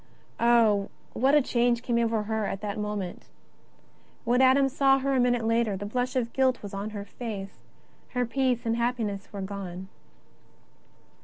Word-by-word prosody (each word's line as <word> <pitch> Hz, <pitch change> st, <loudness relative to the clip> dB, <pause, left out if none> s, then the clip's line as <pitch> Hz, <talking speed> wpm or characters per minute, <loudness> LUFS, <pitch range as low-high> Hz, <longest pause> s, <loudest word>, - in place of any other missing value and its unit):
Oh, 225 Hz, -4 st, +4 dB, 0.2 s
what 270 Hz, +5 st, +3 dB
a 295 Hz, -, +5 dB
change 240 Hz, -1 st, +1 dB
came 240 Hz, -2 st, +1 dB
over 225 Hz, -2 st, +1 dB
her 220 Hz, -1 st, -1 dB
in 195 Hz, -, -3 dB
that 205 Hz, 0 st, -3 dB
moment! 210 Hz, -4 st, -4 dB, 1.0 s
When 245 Hz, +2 st, +2 dB
Adam 265 Hz, +1 st, +5 dB
saw 270 Hz, 0 st, +3 dB
her 270 Hz, +1 st, -1 dB
a 260 Hz, -, +2 dB
minute 245 Hz, -2 st, +2 dB
later, 230 Hz, -3 st, +1 dB
the 205 Hz, -, -5 dB
blush 250 Hz, +4 st, -2 dB
of 235 Hz, -2 st, -1 dB
guilt 260 Hz, -3 st, +1 dB
was 200 Hz, -, -7 dB
on 200 Hz, +2 st, -4 dB
her 205 Hz, -2 st, -6 dB
face, 205 Hz, -2 st, -7 dB, 0.6 s
her 250 Hz, 0 st, +2 dB
peace 250 Hz, 0 st, 0 dB
and 230 Hz, 0 st, 0 dB
happiness 230 Hz, -5 st, -2 dB
were 200 Hz, -, -6 dB
gone. 190 Hz, -1 st, -6 dB
230 Hz, 165 wpm, -27 LUFS, 205-250 Hz, 1.0 s, a